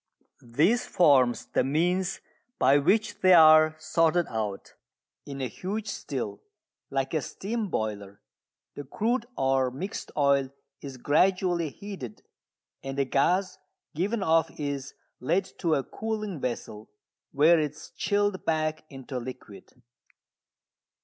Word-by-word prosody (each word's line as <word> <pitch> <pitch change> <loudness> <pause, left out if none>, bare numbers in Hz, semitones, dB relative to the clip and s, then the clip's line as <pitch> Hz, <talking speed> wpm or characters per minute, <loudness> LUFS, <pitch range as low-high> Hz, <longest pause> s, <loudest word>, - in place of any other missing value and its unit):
This 205 - +3
forms 135 -8 +3
the - - 0
means 180 +7 0 0.4
by 135 +3 +4
which 210 +9 +1
they 185 -1 +7
are 155 -1 +7
sorted 165 +2 +1
out. 105 -3 -4 0.5
In 140 -1 -6
a 130 - -1
huge 200 - -5
still, 125 - -5 0.5
like 135 +1 -2
a 155 - +1
steam 215 - -4
boiler, 100 - -4 0.5
the 145 - -7
crude 230 - -1
or 135 -1 +2
mixed 175 - -6
oil 140 -2 +3 0.3
is 135 -2 -8
gradually 175 +4 +2
heated, 185 - -9 0.6
and 135 0 -5
the 140 - +2
gas 180 +9 +1 0.3
given 195 +6 -1
off 165 -2 +3
is 140 -2 -4 0.2
led 170 +9 0
to 165 -3 +1
a 135 - -1
cooling 215 -4 -4
vessel 115 -4 -5 0.4
where 160 +4 +5
it 150 -2 -1
is 150 - -13
chilled 205 -2 0
back 155 -1 -1
into 135 -1 -6
liquid. 125 -4 -11
155 Hz, 125 wpm, -27 LUFS, 135-185 Hz, 0.6 s, they